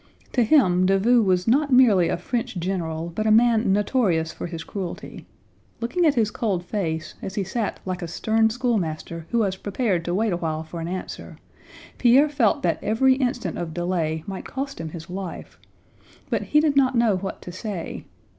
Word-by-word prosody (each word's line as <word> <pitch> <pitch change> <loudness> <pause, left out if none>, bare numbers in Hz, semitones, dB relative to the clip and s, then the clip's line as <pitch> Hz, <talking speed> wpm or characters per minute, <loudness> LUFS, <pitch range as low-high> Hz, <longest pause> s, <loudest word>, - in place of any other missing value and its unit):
To 250 - +3
him 185 - +4
Davout 220 +5 +4
was 180 0 +1
not 280 +5 +3
merely 215 -10 +5
a - - 0
French 245 -4 -3
general, 170 -2 -3
but 215 +4 -1
a - - +4
man 225 -2 +4
notorious 195 -6 +1
for - - -6
his 165 -2 -6
cruelty. 190 -4 -7 0.5
Looking 330 +9 +1
at 290 - +3
his 220 -3 +2
cold 195 -7 -2
face, 160 -6 -3
as 190 - -6
he 200 - 0
sat 210 +3 -3
like 185 -1 -3
a 170 - -4
stern 220 +6 +1
schoolmaster 175 -9 -2
who 235 - 0
was 195 -4 +1
prepared 200 -3 -1
to 175 - -1
wait 215 -1 +1
awhile 160 -2 -2
for 165 +1 -8
an 165 - -4
answer, 185 +1 -6 0.6
Pierre 260 +5 +5
felt 260 -8 +1
that 170 -2 0
every 245 +5 +3
instant 250 -2 -2
of 160 -2 -5
delay 170 -3 -1
might 195 -1 -6
cost 275 -6 -5
him 160 - -5
his 165 +1 -9
life; 185 -1 -7 0.7
but - - +1
he 300 - +2
did 300 -2 +2
not 265 -2 +3
know 235 -4 +3
what 190 +1 -5
to 180 - -7
say. 185 -2 -6
195 Hz, 185 wpm, -24 LUFS, 175-235 Hz, 0.7 s, merely